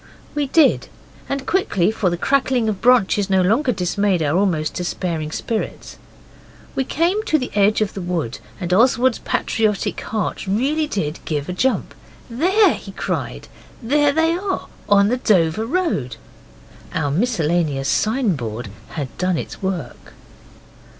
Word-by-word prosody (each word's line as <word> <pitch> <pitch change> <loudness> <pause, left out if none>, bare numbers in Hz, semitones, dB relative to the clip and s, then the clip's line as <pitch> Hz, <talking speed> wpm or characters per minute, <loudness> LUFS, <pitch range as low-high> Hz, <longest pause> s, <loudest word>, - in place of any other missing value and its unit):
We 295 -1 -1
did, 305 0 +3 0.4
and 275 -1 -2
quickly, 215 - +1
for 215 -4 0
the 175 - -2
crackling 260 0 +1
of 205 -3 -2
branches 210 -5 +3
no 190 -1 +3
longer 240 +9 +2
dismayed 190 -2 0
our 145 +1 +1
almost 175 -6 +1
despairing 170 -3 -3
spirits. 220 +6 -4 0.7
We 265 - 0
came 345 +10 +1
to 310 - +3
the 255 -4 -4
edge 205 +1 +3
of 210 - 0
the 195 - -5
wood, 170 -9 -3 0.2
and 180 -2 -2
Oswald's 245 +3 +3
patriotic 215 -3 -1
heart 215 -2 -3
really 280 +10 +1
did 160 - -3
give 145 -2 -2
a - - -2
jump, 260 +8 0 0.4
and 235 +4 -6 0.4
he - - -10
cried, - - -4 0.4
'There 290 +4 +3
they 320 +2 +2
are, 375 +2 -3 0.2
on 200 0 +5
the 250 - +1
Dover 210 -2 +2
Road.' 300 - -1 0.8
Our 145 - 0
miscellaneous 165 - 0
signboard 145 - 0 0.2
had 135 -7 -5
done 180 -1 +1
its - - -6
work. 180 -10 -5
205 Hz, 145 wpm, -20 LUFS, 175-260 Hz, 0.8 s, on